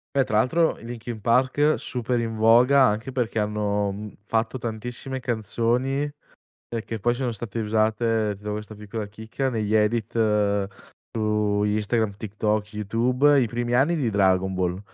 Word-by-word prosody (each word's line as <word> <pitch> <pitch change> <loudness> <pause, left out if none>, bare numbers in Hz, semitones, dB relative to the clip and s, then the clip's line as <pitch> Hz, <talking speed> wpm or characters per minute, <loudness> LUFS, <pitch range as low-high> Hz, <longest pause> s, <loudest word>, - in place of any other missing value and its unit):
Beh 135 - +4
tra 105 -4 0
l'altro 165 +8 +2
i - - -12
Linkin 120 -1 -6
Park 130 +7 +3
super 125 0 -2
in 115 -1 -3
voga 125 +5 +6
anche 110 +4 -1
perché 120 -3 -2
hanno, 105 -1 0
mhmm, 105 +1 -7
fatto 110 +3 -1
tantissime 120 +3 -5
canzoni, 120 +3 0 0.7
ehm, 115 -1 -3
che 115 -2 -5
poi 120 +4 +2
sono 125 -1 -2
state 115 +1 -6
usate, 110 0 +1
ti 100 - -19
do 105 - -2
questa 105 0 -6
piccola 105 +1 -5
chicca, 110 +5 -4
negli 110 -3 -1
edit 110 +1 +1 1.0
su 105 -2 0
Instagram, 105 0 0
TikTok, 105 0 -2
YouTube, 125 +7 +3
i 120 - +1
primi 120 +1 -2
anni 145 +7 +3
di 130 -7 0
Dragon 95 -2 +2
Ball, 90 0 -1
110 Hz, 155 wpm, -24 LUFS, 105-120 Hz, 1.0 s, voga